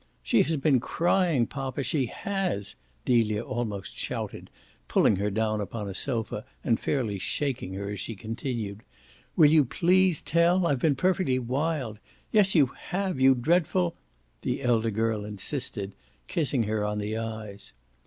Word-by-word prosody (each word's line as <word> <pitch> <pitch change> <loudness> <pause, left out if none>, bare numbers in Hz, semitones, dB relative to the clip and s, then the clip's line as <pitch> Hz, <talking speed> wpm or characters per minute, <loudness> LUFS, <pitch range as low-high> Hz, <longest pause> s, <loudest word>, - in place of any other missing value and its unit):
"She - - +4
has 160 +2 +1
been 135 -2 +3
crying, 170 -1 +2
poppa 135 +1 -4
she 130 0 0
HAS," 190 - -2 0.3
Delia 110 -3 +2
almost 105 -6 -4
shouted, - - -5 0.4
pulling 100 - +3
her 100 +2 0
down 110 +1 0
upon 105 +1 -4
a 100 - -4
sofa 110 -1 -3 0.2
and 115 - +2
fairly 115 -9 -1
shaking 130 -5 -2
her 100 +1 -4
as 100 - -5
she 115 - -5
continued. 110 -1 -4 0.5
"Will 150 -2 +7
you 155 -2 +6
please 180 +5 +3
tell? 170 +2 +3
I've 145 -5 +1
been 150 -3 +3
perfectly 180 -3 +2
wild! 130 -2 -2 0.3
Yes 200 -3 +4
you 150 -4 +7 0.2
have, 190 -4 -1
you 130 0 +6
dreadful 170 +5 +1 0.2
!" - - -40
the - - -2
elder 115 -2 +2
girl 110 0 0
insisted, 105 -1 -4 0.3
kissing 140 -6 0
her 110 0 -1
on 105 0 -1
the 105 +1 -2
eyes. 110 -3 -6
120 Hz, 155 wpm, -27 LUFS, 105-155 Hz, 0.5 s, Will